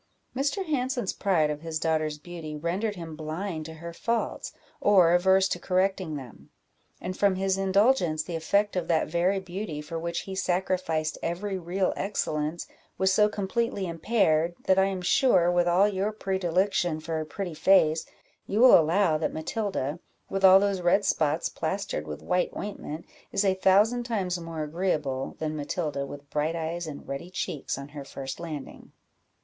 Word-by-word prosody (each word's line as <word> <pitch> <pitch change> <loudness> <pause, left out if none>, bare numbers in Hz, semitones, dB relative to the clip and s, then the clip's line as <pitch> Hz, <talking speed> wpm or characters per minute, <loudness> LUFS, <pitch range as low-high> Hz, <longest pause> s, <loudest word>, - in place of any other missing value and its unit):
Mr. 290 +9 0
Hanson's 260 - -1
pride 165 -7 +2
of 150 0 -5
his 165 -1 -3
daughter's 155 -1 0
beauty 160 -1 -8
rendered 185 +8 -2
him 165 -3 -7
blind 155 +2 -4
to 160 - -9
her 170 +1 -8
faults, 230 +6 -2 0.3
or 185 -5 +5
averse 190 +2 +4
to 175 - -2
correcting 185 -3 0
them; 130 -5 -10 0.5
and 185 - -5
from 200 -1 +3
his 190 0 +1
indulgence, 195 -4 +2
the 170 +1 -5
effect 200 +6 +1
of 180 -2 -1
that 165 -2 +2
very 175 +4 +1
beauty 190 -3 -5
for 155 +2 -5
which 170 +1 -3
he 195 - -7
sacrificed 180 -4 -1
every 190 +3 -2
real 185 +2 0
excellence, 155 -5 -2 0.3
was 190 0 +3
so 210 +1 +4
completely 205 0 -1
impaired, 170 -2 +1
that 190 0 +4
I 190 - +5
am 190 -2 -3
sure, 175 -4 +4
with 175 0 +2
all 180 +4 +5
your 200 +1 -1
predilection 190 -4 0
for 160 0 -3
a - - -2
pretty 175 +2 -5
face, 160 -1 +4 0.4
you 205 - -1
will 255 +1 +9
allow 165 0 +2
that 160 - -1
Matilda, 165 - -3 0.3
with 195 0 -2
all 190 0 +9
those 200 -2 0
red 180 +3 +3
spots 155 -3 +1
plastered 190 - -3
with 75 -1 -7
white 180 0 +1
ointment, 170 -6 -6 0.3
is 200 - +1
a 190 - +4
thousand 205 +6 +3
times 190 -7 -1
more 165 -2 -5
agreeable 150 -5 -2
than 155 -1 -3
Matilda 145 -1 -3
with 145 +1 -10
bright 150 +2 0
eyes 165 +1 -3
and 145 -2 -8
ruddy 140 +6 -5
cheeks 180 -7 -3
on 140 +1 -8
her 145 -1 -8
first 135 0 -7
landing." 155 -5 -8
175 Hz, 170 wpm, -27 LUFS, 155-195 Hz, 0.5 s, will